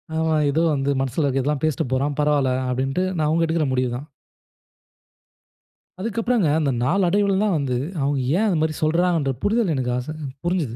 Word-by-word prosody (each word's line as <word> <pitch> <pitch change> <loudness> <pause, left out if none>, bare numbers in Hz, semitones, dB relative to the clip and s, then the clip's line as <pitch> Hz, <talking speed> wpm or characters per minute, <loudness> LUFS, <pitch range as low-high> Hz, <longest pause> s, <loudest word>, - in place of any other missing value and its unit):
ஆமா, 160 0 +1 0.2
ஏதோ 150 +3 +1
வந்து 140 -1 -1
மனசுல 135 +3 -1
இருக்கறதெல்லாம் 135 +1 0
பேசிட்டு 155 -3 0
போறான், 140 +2 -1
பரவால்ல. 145 -3 +2 0.2
அப்டின்ட்டு 135 +7 -1
ஆனா 160 -4 0
அவங்க 165 +2 +2
எடுக்குற 160 -1 0
முடிவு 125 -1 +1
தான். 140 +4 -9 1.9
அதுக்கப்புறம்ங்க 230 -1 0
அந்த 145 -3 +1
நாளடைவில 195 +6 +2
தான் 205 -4 +1
வந்து 135 -4 -1 0.3
அவங்க 140 0 0 0.2
ஏன் 215 - +2
அது 185 -5 +1
மாரி 155 0 0
சொல்றாங்கன்ற 165 -2 +2
புரிதல் 210 -4 +1
எனக்கு 125 -2 -1
ஆச 130 +5 -5 0.3
புரிஞ்சுது. 170 -9 -1
155 Hz, 155 wpm, -22 LUFS, 135-175 Hz, 1.9 s, பரவால்ல